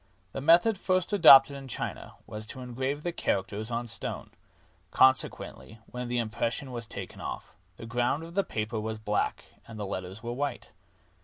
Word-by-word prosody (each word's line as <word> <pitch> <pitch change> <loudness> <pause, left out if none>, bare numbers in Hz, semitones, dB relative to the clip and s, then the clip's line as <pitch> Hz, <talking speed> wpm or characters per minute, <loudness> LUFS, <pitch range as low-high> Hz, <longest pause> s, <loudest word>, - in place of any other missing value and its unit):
The 135 - -5
method 175 +8 +5
first 185 +1 0
adopted 140 -7 +8
in 135 -1 -8
China 125 - -5
was 110 0 -8
to 130 - -9
engrave 130 +4 -3
the 175 - -1
characters 105 - -2
on 120 0 -2
stone; 115 -1 -5 0.6
consequently, 130 -3 +2
when 125 0 -6
the 120 0 -1
impression 115 +3 -2
was 120 -2 -5
taken - - -7
off, - - -6 0.2
the - - -8
ground 120 +6 0
of 165 +1 -10
the 200 +2 +2
paper 110 - -3
was 110 +1 -4
black 105 -1 -1 0.2
and 110 -2 -9
the 105 - -3
letters 95 +2 -6
were 120 0 -3
white. 140 +3 -4
120 Hz, 170 wpm, -29 LUFS, 110-140 Hz, 0.6 s, adopted